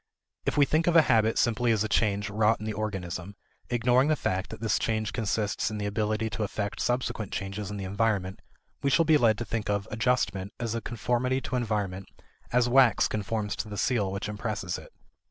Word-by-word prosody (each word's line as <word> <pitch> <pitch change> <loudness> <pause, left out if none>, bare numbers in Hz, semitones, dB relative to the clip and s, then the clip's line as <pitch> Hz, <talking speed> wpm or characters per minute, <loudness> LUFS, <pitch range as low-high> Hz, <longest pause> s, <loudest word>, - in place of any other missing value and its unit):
If - - 0
we 145 - +6
think 160 +4 +1
of 175 - +3
a 165 - +8
habit 110 -3 +3
simply 120 0 +2
as 110 -2 +2
a - - -1
change 105 -1 +1
wrought 110 +2 +2
in 110 - -6
the 110 - -2
organism, 95 -2 -4 0.3
ignoring 125 +2 +3
the 155 - +3
fact 95 -8 -2
that - - -8
this 110 -1 +1
change 110 -1 -1
consists 105 -2 -1
in 105 -1 -5
ability 105 +2 -1
to - - -4
effect 105 0 -3
subsequent 120 -4 -1
changes 100 +1 -4
in 105 - -5
the 100 - -4
environment, 100 -1 -1 0.4
we 140 - +1
shall 165 +4 +4
be 155 -1 +5
led 110 -4 +4
to 120 - -4
think 110 0 -3
of 100 -1 0
"adjustment" 110 -4 0
as 115 -2 -2
a 115 - -2
conformity 125 +3 0
to 130 - -4
environment 105 -6 -2 0.4
as 125 0 +3
wax 125 -1 +5
conforms 105 0 -2
to - - -3
the 105 - -6
seal 105 -6 +1
which 100 +1 -3
impresses 105 -3 -3
it. - - -14
110 Hz, 205 wpm, -28 LUFS, 100-120 Hz, 0.4 s, a